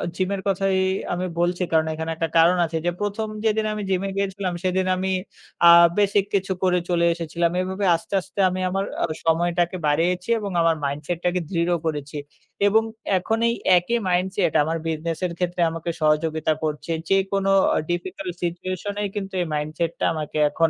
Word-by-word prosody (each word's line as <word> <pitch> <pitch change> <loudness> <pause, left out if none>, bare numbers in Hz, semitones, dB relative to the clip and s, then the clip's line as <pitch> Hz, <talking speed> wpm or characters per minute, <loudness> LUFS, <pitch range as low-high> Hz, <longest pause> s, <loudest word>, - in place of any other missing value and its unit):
gym 185 0 -1
এর 195 - -5
কথাই 195 0 +1 0.4
আমি 180 +1 -2
বলছি, 175 +1 +1
কারণ 160 -1 +4
এখানে 160 +1 -4
একটা 165 0 -2
কারণ 170 +2 +5
আছে 165 0 -3
যে, 175 - +2
প্রথম 205 +2 -2 0.2
যেদিন 220 0 +2
আমি 210 - -4
gym 185 -1 +1
এ - - -3
গিয়েছিলাম 195 -2 -2
সেদিন 185 0 +1
আমি 190 +1 -1 0.6
আ - - +10 0.3
বেসিক 205 -1 +3
কিছু 195 0 0
করে 180 -1 +3
চলে 170 -1 +2
এসেছিলাম। 170 0 -1
এভাবে 190 +2 -2
আস্তে, 165 - -8
আস্তে 190 - -11
আমি 185 +1 -3
আমার 195 +2 -1 0.2
আ - - +4 0.2
সময়টাকে 175 +2 +1
বাড়িয়েছি, 180 +6 +1
এবং 205 -2 -4
আমার 165 -1 +3
mindset 145 +5 -3
টাকে 180 +1 +1
দৃঢ় 170 -1 0
করেছি 150 -2 -3 0.5
এবং 220 +2 +4 0.3
এখন 220 +5 -1
এই 235 - 0 0.2
একই 205 +7 0
mindset 180 -1 +1
আমার 160 +2 -1
business 160 0 -2
এর 175 - -3
ক্ষেত্রে 175 -1 -1
আমাকে 165 +1 -5
সহযোগিতা 155 +1 +2
করছে। 155 +1 -3 0.2
যেকোনো 195 0 +1 0.4
difficult 180 +1 -3
situation 185 +3 -3
এ - - 0 0.2
কিন্তু 195 0 -8
এই 175 - -2
mindset 155 +3 -2
টা - - +1
আমাকে 155 -1 -4
এখন 165 +2 +2
175 Hz, 175 wpm, -23 LUFS, 165-190 Hz, 0.6 s, আ